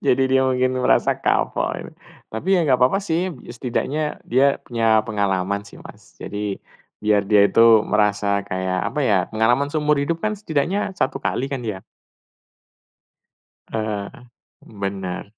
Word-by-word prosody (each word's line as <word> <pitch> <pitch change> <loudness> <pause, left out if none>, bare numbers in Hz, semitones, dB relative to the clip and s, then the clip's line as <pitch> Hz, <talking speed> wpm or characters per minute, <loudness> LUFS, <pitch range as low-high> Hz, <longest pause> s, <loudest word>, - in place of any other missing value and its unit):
Jadi 135 - +3
dia 130 0 +3
mungkin 130 0 0
merasa - - +3
kapok - - 0
ini. - - -10 0.4
Tapi, 110 +12 -5
ya, - - +3
nggak 130 -4 +3
apa-apa 130 +10 +4
sih, 180 -1 -1 0.3
setidaknya 135 +5 -2 0.3
dia 135 +3 +3
punya 115 -2 +2
pengalaman 100 -1 -1
sih, - - -14
Mas. - - -15
Jadi, 105 -1 -4 0.4
biar 105 -1 +2
dia 105 -1 +6
itu 100 - +1 0.3
merasa 105 -1 +1 0.2
kayak, 95 0 -2
apa 150 - -3
ya, 105 -5 +3
pengalaman 120 +6 +2
seumur 150 -1 +1
hidup 165 +4 -1
kan 215 - +1
setidaknya 190 +2 -1
satu 135 +1 -1
kali - - -1
kan, 135 - -2
ya? 105 -4 -5 1.9
Heeh. 110 -2 -3 0.7
Bener. 95 -2 -4
115 Hz, 140 wpm, -21 LUFS, 105-140 Hz, 1.9 s, dia